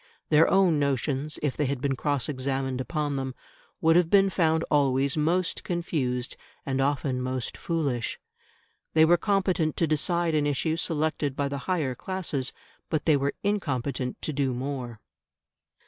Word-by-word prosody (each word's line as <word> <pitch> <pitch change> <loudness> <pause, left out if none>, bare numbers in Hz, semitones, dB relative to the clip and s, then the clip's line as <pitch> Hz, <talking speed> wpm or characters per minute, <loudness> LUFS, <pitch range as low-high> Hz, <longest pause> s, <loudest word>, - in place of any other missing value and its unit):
Their 155 +1 +5
own 185 -6 +4
notions, 140 +1 -1
if 145 -3 0
they 150 - 0
had 140 -1 -2
been 140 0 0
cross 140 -2 0
examined 130 -1 -2
upon 145 0 -2
them, 130 -1 -4 0.5
would 165 0 +4
have 175 -2 +4
been 195 0 +5
found 160 -3 +2
always 140 -2 +2
most 165 +4 0
confused 135 -8 -2 0.3
and 135 -1 0
often 135 -2 0
most 130 -1 -3
foolish. 140 -9 -2 0.8
They 160 0 +7
were 170 +2 +6
competent 185 -6 +1
to 165 - +3
decide 165 +2 +1
an 150 -1 +2
issue 155 +3 0
selected 155 -3 -1
by 140 -1 -1
the 140 0 -3
higher 155 -8 +1
classes, 155 -5 -3 0.4
but 155 -2 -1
they 155 - +5
were 140 0 0
incompetent 140 - -1
to 155 - -2
do 135 -3 0
more. 125 -3 -4
145 Hz, 155 wpm, -27 LUFS, 135-165 Hz, 0.8 s, They